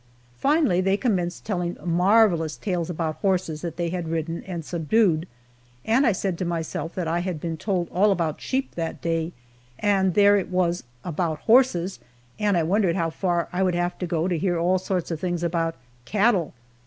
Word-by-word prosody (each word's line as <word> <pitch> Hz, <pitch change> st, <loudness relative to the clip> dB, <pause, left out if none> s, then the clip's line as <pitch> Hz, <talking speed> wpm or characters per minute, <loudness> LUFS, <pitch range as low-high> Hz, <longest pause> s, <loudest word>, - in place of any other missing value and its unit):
Finally 285 Hz, -, +3 dB
they 195 Hz, +1 st, +2 dB
commenced 180 Hz, -8 st, -1 dB
telling 175 Hz, -4 st, -2 dB
marvelous 175 Hz, -2 st, +3 dB
tales 180 Hz, -5 st, -2 dB
about 160 Hz, -2 st, -2 dB
horses 180 Hz, -6 st, 0 dB
that 170 Hz, -2 st, -5 dB
they 170 Hz, -1 st, -1 dB
had 175 Hz, -1 st, -3 dB
ridden 165 Hz, +1 st, -3 dB
and 170 Hz, -4 st, -5 dB
subdued, 170 Hz, 0 st, +1 dB, 0.6 s
and 250 Hz, +5 st, +3 dB
I -, -, +5 dB
said 190 Hz, -2 st, -2 dB
to -, -, -1 dB
myself 165 Hz, -1 st, -3 dB
that 180 Hz, -3 st, -2 dB
I 165 Hz, +2 st, 0 dB
had 175 Hz, -3 st, -3 dB
been 165 Hz, +1 st, -3 dB
told 180 Hz, 0 st, -1 dB
all 200 Hz, +4 st, +3 dB
about 165 Hz, -5 st, -1 dB
sheep 265 Hz, +1 st, -2 dB
that 165 Hz, -1 st, -4 dB
day, 165 Hz, 0 st, -1 dB, 0.5 s
and 195 Hz, -3 st, +2 dB
there 205 Hz, 0 st, +6 dB
it 195 Hz, -, -2 dB
was 180 Hz, -3 st, 0 dB, 0.2 s
about 165 Hz, -2 st, -2 dB
horses, 220 Hz, -7 st, +3 dB, 0.4 s
and 205 Hz, -3 st, +2 dB
I 165 Hz, -, +2 dB
wondered 185 Hz, +1 st, +2 dB
how 165 Hz, -3 st, 0 dB
far 175 Hz, 0 st, 0 dB
I 180 Hz, -, 0 dB
would 185 Hz, -2 st, +2 dB
have 175 Hz, 0 st, -1 dB
to 180 Hz, -, -2 dB
go 165 Hz, 0 st, 0 dB
to 175 Hz, -3 st, 0 dB
hear 175 Hz, 0 st, 0 dB
all 180 Hz, +3 st, +2 dB
sorts 180 Hz, -2 st, -2 dB
of 165 Hz, -, -3 dB
things 175 Hz, -1 st, -2 dB
about 165 Hz, -1 st, 0 dB, 0.3 s
cattle! 195 Hz, -, +1 dB
175 Hz, 190 wpm, -24 LUFS, 165-195 Hz, 0.6 s, there